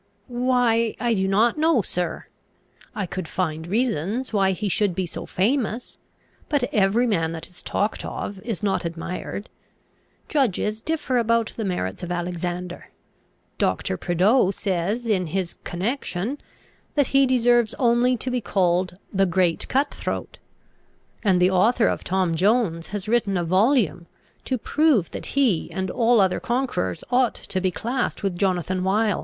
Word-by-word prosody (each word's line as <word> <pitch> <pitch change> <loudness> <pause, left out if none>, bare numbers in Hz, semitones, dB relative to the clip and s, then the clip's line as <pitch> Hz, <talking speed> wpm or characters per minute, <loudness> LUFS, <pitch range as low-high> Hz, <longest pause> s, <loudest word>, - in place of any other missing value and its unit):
"Why, 245 -2 +1
I 240 -1 +1
do 190 -3 +1
not 220 +8 +2
know, 315 -8 +3
sir. 180 -1 -3 0.7
I 200 - -1
could 185 -1 -5
find 160 -3 -2
reasons 225 - -1
why 195 -2 +3
he 205 +3 -3
should 195 -1 +1
be 190 0 -1
so 170 - -6
famous; 235 +3 -1 0.5
but 290 -4 +1
every 210 +2 +3
man 165 -8 0
that 165 0 -6
is 180 - -11
talked 210 +2 -1
of 200 -1 -5
is 210 0 -5
not 195 -2 +1
admired. 170 +4 -5 0.8
Judges 220 - 0
differ 300 -5 0
about 230 -1 +1
the 225 - -3
merits 180 - -2
of 175 - -5
Alexander. 175 0 -4 0.7
Doctor 95 0 0
Prideaux 185 - +3
says 195 +4 -1
in 190 -6 +1
his 180 +2 -3
Connection, 215 +4 -3 0.6
that 285 -3 +2
he 275 0 +5
deserves 240 -3 +3
only 245 0 +3
to 255 +3 -3
be 250 -1 0
called 180 -3 +1 0.2
the 195 0 +3
Great 175 -1 +1
Cut 275 +2 +1
throat; - - -5 0.8
and 190 -4 +3
the 180 +1 +4
author 220 +6 +3
of - - -1
Tom 185 -2 0
Jones 185 -2 +1
has 205 0 -5
written 215 -4 +1
a 175 - 0
volume, 190 - +2 0.4
to 260 - 0
prove 280 - +2
that - - -6
he 235 -12 +2
and 190 -1 -3
all 235 -1 +3
other 190 -2 +3
conquerors 240 - -1
ought 250 -1 +3
to 185 - -4
be 185 - +2
classed 240 +7 -2
with 195 -3 0
Jonathan 185 -1 0
Wild." 205 +1 +2
200 Hz, 155 wpm, -24 LUFS, 180-240 Hz, 0.8 s, he